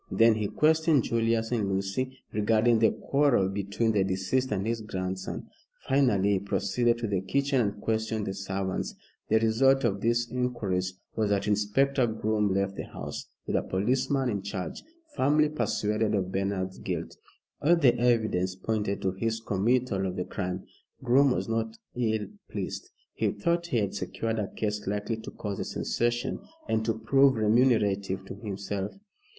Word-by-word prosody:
Then 115 0 +5
he 105 -1 -1
questioned 155 0 +3
Julius 115 0 0
and 110 -5 0
Lucy 100 +7 -2
regarding 110 +2 +3
the 110 - +5
quarrel 140 -9 +2
between 100 +3 0
the 100 -3 +2
deceased 95 +7 0
and 100 -1 -1
his 115 0 -1
grandson. 95 -3 -4 0.4
Finally 120 -8 +3
he 100 - +2
proceeded 100 +5 +1
to 115 -1 -3
the 100 -3 0
kitchen 140 +6 +1
and 100 -2 -1
questioned 110 -1 -1
the 95 - -3
servants. 95 -1 -3 0.3
The 110 - +5
result 125 +5 +3
of 100 -4 0
these 120 +1 +1
inquiries 100 -8 -1 0.2
was 110 -2 +1
that 100 0 +1
Inspector 105 +7 +2 0.2
Groom 105 -2 +1
left 100 0 0
the - - -4
house - - -7 0.2
with - - -2
a - - +3
policeman 130 +7 0
in 100 -4 -1
charge 95 -2 -5 0.3
firmly 150 +3 +3
persuaded 105 -7 0
of 95 -2 -1
Bernard's 95 -1 -2
guilt. - - -4 0.5
All 170 +4 +5
the 135 -8 +4
evidence 110 -7 +2
pointed 105 0 -2
to 95 - +2
his 110 +4 -2
committal 110 -1 +1
of 90 - -4
the 90 - -2
crime. 90 -2 -4 0.4
Groom 135 +3 +5
was 125 - -1
not 115 0 -2 0.2
ill 110 -3 0 0.2
pleased. - - -5 0.2
He - - 0
thought 170 0 0
he 125 - 0
had 100 -3 0
secured 115 -1 -2
a 105 - -1
case 105 -2 -3
likely 105 +3 -1
to 110 - -8
cause 100 -2 -5
a - - -1
sensation, 120 0 -1 0.3
and 110 0 +1
to 115 -1 0
prove 135 +4 +4
remunerative 105 -4 +2
to - - -7
himself. 100 -1 -4
110 Hz, 165 wpm, -28 LUFS, 100-120 Hz, 0.5 s, Then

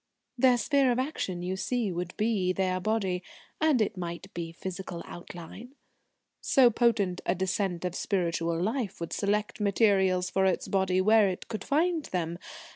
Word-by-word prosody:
"Their 250 0 +4
sphere 275 0 +3
of 240 - 0
action, 225 - -2
you 185 +1 -2
see, 225 +1 -1
would 175 +1 -5
be 210 -4 +1
their 185 -1 0
body. 190 -3 0 0.4
And 300 -8 +4
it 205 -1 -4
might 170 -1 -6
be 170 -1 -5
physical 180 0 -6
outline. 175 - -10 0.7
So 250 -3 +5
potent 210 -6 +1
a - - 0
descent 185 -1 -1
of 180 - -2
spiritual 170 -4 -1
life 220 +2 -2
would 170 - -5
select 210 +2 -1
materials 190 -3 +2
for 190 - +2
its 190 - +1
body 190 -1 +1
where 215 0 +5
it 185 - -6
could 215 -3 -4
find 320 +2 +1
them. 170 -1 -3
190 Hz, 160 wpm, -28 LUFS, 180-225 Hz, 0.7 s, So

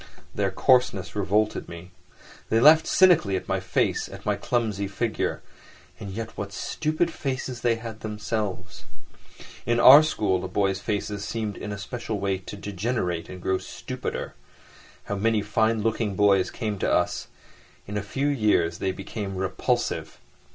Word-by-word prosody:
Their - - 0
coarseness 125 -8 +2
revolted 105 +2 0
me. 85 +2 -10 0.6
They 115 - +3
laughed 155 +5 +7
cynically 170 - +5
at 95 - -4
my - - 0
face, - - 0
at - - -11
my - - +1
clumsy 110 -5 -1
figure; 110 +3 -2 0.6
and 105 - -7
yet 110 +3 -6
what 100 -1 -5
stupid 155 - -1
faces 130 -3 -4
they 120 -1 +2
had 115 -1 -8
themselves. 105 -3 -4 0.8
In 120 0 +1
our 135 +5 +10
school 105 -12 0
the - - -4
boys' 95 0 0
faces 105 -1 -3
seemed 110 -1 -3
in 105 - -6
a 100 - -4
special 110 +1 -5
way 95 -1 -1
to 95 +2 -9
degenerate 100 -3 -2
and 95 - -8
grow 95 +1 0
stupider. - - -6 0.7
How 100 - -4
many 110 0 +1
fine 110 +1 +1
looking 110 -2 0
boys 100 -2 +3
came 105 -4 -4
to - - 0
us! - - 0 0.6
In 105 - -7
a 105 - 0
few 135 +8 -3
years 105 -11 +2
they 95 - 0
became 95 +1 -6
repulsive. 95 0 -1
105 Hz, 155 wpm, -25 LUFS, 95-115 Hz, 0.8 s, our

